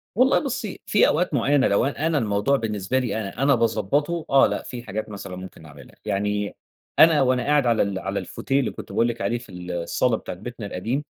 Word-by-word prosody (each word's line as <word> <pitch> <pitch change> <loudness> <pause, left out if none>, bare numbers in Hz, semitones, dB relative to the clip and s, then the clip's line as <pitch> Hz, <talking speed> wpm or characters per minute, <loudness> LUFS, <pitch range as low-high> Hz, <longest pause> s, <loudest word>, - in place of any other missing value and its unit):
والله 255 +3 +4
بُصي، 240 -7 -4
في 210 - +4
أوقات 170 +1 +1
معينة 140 +1 +3
لو 100 +4 +2
أ 145 +3 -1
أنا 160 - +1
الموضوع 105 +2 +1
بالنسبة 110 +2 -1
لي 125 -3 -2
أنا، 110 +5 -4
أنا 140 -1 +5
باضَبّطه، 125 - 0
آه 135 - +6
لأ - - -3
في 120 -2 -7
حاجات 110 0 -5
مثلًا 100 -2 -7
ممكن 90 -3 -10
اعملها، 75 -1 -14
يعني 105 +1 -1 0.4
أنا 160 -3 +7
وأنا 130 -1 +2
قاعد 145 -1 +2
على 115 -2 +3
ال 100 -1 -3
على 95 +1 -3
الفوتيه 135 +1 -2
اللي 130 - -1
كنت - - -10
باقول 115 - +2
لِك 120 -1 -4
عليه 100 +5 0
في 120 -2 -13
ال 90 -1 -7
الصالة 90 +7 0
بتاعة 90 - -7
بيتنا 115 +2 -7
القديم، 115 +9 -3
115 Hz, 215 wpm, -24 LUFS, 100-140 Hz, 0.4 s, أنا